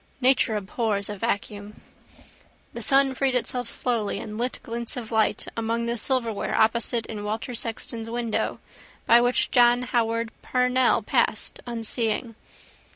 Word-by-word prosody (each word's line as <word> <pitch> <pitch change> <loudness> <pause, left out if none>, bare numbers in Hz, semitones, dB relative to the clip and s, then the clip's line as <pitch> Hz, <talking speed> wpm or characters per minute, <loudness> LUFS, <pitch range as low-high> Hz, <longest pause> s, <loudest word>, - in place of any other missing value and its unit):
Nature 255 -3 +3
abhors 205 0 -2
a 210 - -4
vacuum. 205 -1 -4 0.9
The - - -6
sun 275 0 +3
freed 265 -1 0
itself 245 -1 -1
slowly 230 -5 -1
and 210 - -7
lit 245 +3 -2
glints 235 +1 -5
of 230 -2 -6
light 220 -1 +1
among 230 +1 -1
the 235 0 -1
silverware 235 -2 0
opposite 230 +1 +2
in 210 -2 -6
Walter 220 +4 -3
Sexton's 230 0 -3
window 235 -1 -2 0.5
by 235 +1 +6
which 245 +1 +2
John 245 0 +5
Howard 230 -2 0
Parnell 250 0 +2
passed, - - 0
unseeing. 230 0 -2
235 Hz, 135 wpm, -25 LUFS, 220-245 Hz, 0.9 s, by